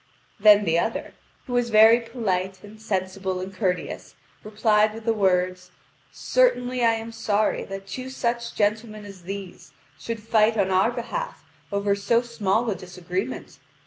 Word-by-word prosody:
Then 210 Hz, 0 st, +7 dB
the 165 Hz, -1 st, +2 dB
other, 225 Hz, -, -3 dB, 0.3 s
who 250 Hz, -, -6 dB
was 245 Hz, -1 st, +1 dB
very 220 Hz, +2 st, +7 dB
polite 190 Hz, -6 st, -3 dB
and 215 Hz, +1 st, -13 dB
sensible 190 Hz, -2 st, -2 dB
and 190 Hz, +1 st, -6 dB
courteous, 185 Hz, -3 st, -3 dB, 0.3 s
replied 215 Hz, 0 st, +2 dB
with 225 Hz, 0 st, -10 dB
the 230 Hz, -, +2 dB
words: 180 Hz, -3 st, 0 dB, 0.4 s
"Certainly 255 Hz, -, +1 dB
I 230 Hz, -1 st, +5 dB
am 225 Hz, 0 st, -5 dB
sorry 215 Hz, -1 st, 0 dB
that 195 Hz, 0 st, -7 dB
two 255 Hz, +7 st, -6 dB
such 235 Hz, -2 st, -2 dB
gentlemen 215 Hz, 0 st, -1 dB
as 195 Hz, -2 st, -11 dB
these 195 Hz, -1 st, -8 dB, 0.3 s
should 225 Hz, +7 st, -5 dB
fight 220 Hz, 0 st, +3 dB
on 190 Hz, -2 st, +1 dB
our 190 Hz, +4 st, +3 dB
behalf 240 Hz, -, -5 dB, 0.3 s
over 200 Hz, 0 st, +1 dB
so 230 Hz, +4 st, +1 dB
small 230 Hz, -1 st, 0 dB
a -, -, +1 dB
disagreement. 185 Hz, +5 st, -5 dB
210 Hz, 150 wpm, -24 LUFS, 190-230 Hz, 0.4 s, Then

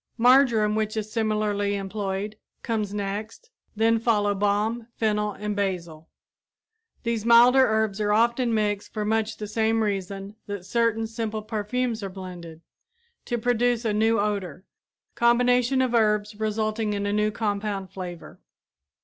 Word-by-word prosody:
Marjoram, 240 Hz, -3 st, +4 dB
which 215 Hz, 0 st, -1 dB
is 215 Hz, 0 st, -3 dB
similarly 210 Hz, -2 st, 0 dB
employed, 200 Hz, +1 st, -3 dB, 0.3 s
comes 215 Hz, -4 st, -2 dB
next, 210 Hz, -, -5 dB, 0.2 s
then 225 Hz, +1 st, +3 dB
follow 210 Hz, -3 st, +2 dB
balm, 210 Hz, +3 st, 0 dB
fennel, 210 Hz, -1 st, 0 dB
and 210 Hz, +1 st, -4 dB
basil. 170 Hz, -5 st, -3 dB, 0.9 s
These 230 Hz, -2 st, -1 dB
milder 240 Hz, +3 st, +7 dB
herbs 220 Hz, -2 st, 0 dB
are 210 Hz, 0 st, +1 dB
often 235 Hz, +3 st, +2 dB
mixed 210 Hz, -2 st, -1 dB
for 210 Hz, -1 st, -1 dB
much 220 Hz, 0 st, 0 dB
the 210 Hz, -, -5 dB
same 220 Hz, +1 st, +1 dB
reason 195 Hz, 0 st, -4 dB
that 205 Hz, -3 st, -6 dB
certain 230 Hz, 0 st, +1 dB
simple 220 Hz, -1 st, -4 dB
perfumes 225 Hz, +2 st, -2 dB
are 195 Hz, -, -4 dB
blended 180 Hz, -4 st, -9 dB, 0.6 s
to 240 Hz, -, -1 dB
produce 240 Hz, 0 st, +1 dB
a 215 Hz, -, +1 dB
new 225 Hz, +1 st, +2 dB
odor 200 Hz, -4 st, -2 dB, 0.5 s
combinations 245 Hz, +2 st, +3 dB
of 250 Hz, -2 st, -1 dB
herbs 210 Hz, -2 st, +2 dB
resulting 215 Hz, 0 st, -1 dB
in 200 Hz, 0 st, -2 dB
a 205 Hz, -, -1 dB
new 210 Hz, 0 st, +2 dB
compound 205 Hz, -3 st, -3 dB
flavor. 180 Hz, -3 st, -8 dB
215 Hz, 140 wpm, -25 LUFS, 205-225 Hz, 0.9 s, milder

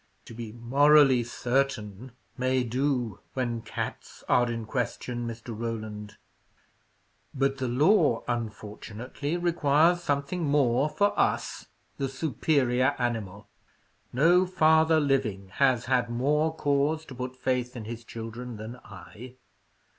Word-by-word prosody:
"To -, -, -11 dB
be 115 Hz, -1 st, -7 dB
'morally 135 Hz, +2 st, +4 dB
certain' 120 Hz, -2 st, -2 dB, 0.2 s
may 130 Hz, 0 st, +1 dB
do 125 Hz, -2 st, -1 dB, 0.2 s
when 120 Hz, -3 st, -2 dB
cats 110 Hz, -, -6 dB
are 120 Hz, -1 st, +3 dB
in 115 Hz, -1 st, -4 dB
question, 120 Hz, 0 st, -3 dB
Mr. 115 Hz, 0 st, -7 dB
Roland; 110 Hz, -2 st, -5 dB, 1.2 s
but 135 Hz, 0 st, 0 dB
the 130 Hz, -, -1 dB
law, 145 Hz, -, +3 dB
unfortunately, 115 Hz, +5 st, -4 dB
requires 170 Hz, 0 st, +3 dB
something 145 Hz, +3 st, -1 dB
more 140 Hz, -2 st, +2 dB
for 205 Hz, +5 st, +1 dB
us, -, -, 0 dB, 0.3 s
the 135 Hz, -1 st, -1 dB
superior 135 Hz, -1 st, +1 dB
animal. 110 Hz, -5 st, -3 dB, 0.6 s
No 175 Hz, +8 st, +4 dB
father 160 Hz, -2 st, +4 dB
living 125 Hz, -10 st, 0 dB
has 130 Hz, -4 st, +3 dB
had 125 Hz, -2 st, +1 dB
more 150 Hz, +6 st, +1 dB
cause 145 Hz, +2 st, 0 dB
to 135 Hz, -, -10 dB
put 125 Hz, 0 st, -5 dB
faith 125 Hz, -1 st, -1 dB
in 115 Hz, -3 st, -6 dB
his 115 Hz, +1 st, -7 dB
children 115 Hz, +1 st, -7 dB
than 110 Hz, +3 st, -8 dB
I. 110 Hz, +5 st, -12 dB
125 Hz, 120 wpm, -27 LUFS, 115-145 Hz, 1.2 s, morally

